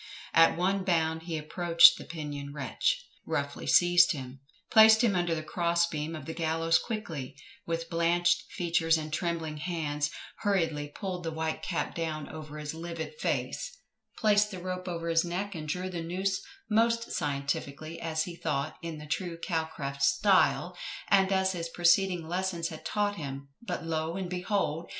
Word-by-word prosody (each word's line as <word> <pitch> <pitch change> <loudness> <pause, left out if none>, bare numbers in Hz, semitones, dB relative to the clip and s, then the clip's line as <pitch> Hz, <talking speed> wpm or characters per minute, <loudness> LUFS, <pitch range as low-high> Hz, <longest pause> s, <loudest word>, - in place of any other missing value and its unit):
At 165 0 +6
one 190 +2 +1
bound 160 -3 +1
he 165 - -1
approached 170 +2 +6
the - - -8
pinioned 145 -3 -6
wretch, - - -1 0.2
roughly - - -3
seized 175 -1 +6
him, 130 -2 -8 0.3
placed 220 +1 +8
him 215 -5 +3
under 175 -2 +1
the 155 - -4
cross 170 +1 +1
beam 155 -1 -4
of 155 -3 -8
the 160 - -5
gallows 165 0 +2
quickly, 170 - -5 0.3
with 165 0 -2
blanched 170 +1 +1
features 165 -2 +2
and 155 -1 -5
trembling 165 -3 -2
hands, 150 -3 -2 0.3
hurriedly 165 -8 0
pulled 180 +4 -5
the 165 - -2
white 160 0 -2
cap 175 - -2
down 155 -3 -3
over 155 -1 -8
his 150 0 -5
livid 165 - -6
face, - - -2 0.4
placed 210 -1 +4
the 190 - -7
rope 185 +1 -5
over 170 -1 -3
his 165 0 +3
neck, 185 +4 -3
and 155 -3 -6
drew 180 +4 -2
the 175 -2 -4
noose 185 +3 -1 0.3
most 230 +1 +2
scientifically 140 +2 -3
as 160 -1 0
he 175 0 -7
thought, 155 -2 -2
in 165 -2 -5
the 150 - -9
true 165 +2 -3
Calcraft 160 -5 -3
style, 100 -7 +3 0.3
and 195 -1 +4
as 190 0 +2
his 170 -2 -4
preceding 175 0 +3
lessons 175 -1 -1
had 160 - -9
taught 205 -1 0
him; 140 -2 -6
but, 235 - -4
lo, 160 0 -2
and 185 -2 -4
behold! 180 -3 -1
165 Hz, 165 wpm, -29 LUFS, 155-185 Hz, 0.4 s, placed